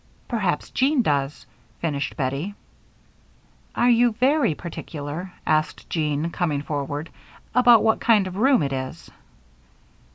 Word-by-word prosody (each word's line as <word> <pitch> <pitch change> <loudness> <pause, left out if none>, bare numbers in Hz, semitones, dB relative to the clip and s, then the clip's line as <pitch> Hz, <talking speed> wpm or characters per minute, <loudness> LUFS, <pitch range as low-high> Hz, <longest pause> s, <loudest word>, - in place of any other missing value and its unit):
"Perhaps 195 -10 -1
Jean 270 -1 +2
does," 140 -3 -1 0.3
finished 145 -4 -2
Bettie. 140 +9 -2 1.2
"Are 240 - +3
you 240 0 +4
very 260 - +2
particular," 160 +1 -6
asked 155 0 0
Jean, 155 0 -1
coming 150 -6 -1
forward, 145 +1 -4 0.4
"about 240 -2 +6
what 220 0 +3
kind 215 -4 +4
of 185 -1 -6
room 255 - +3
it 135 -1 -2
is?" 130 0 -6
170 Hz, 120 wpm, -23 LUFS, 145-230 Hz, 1.2 s, about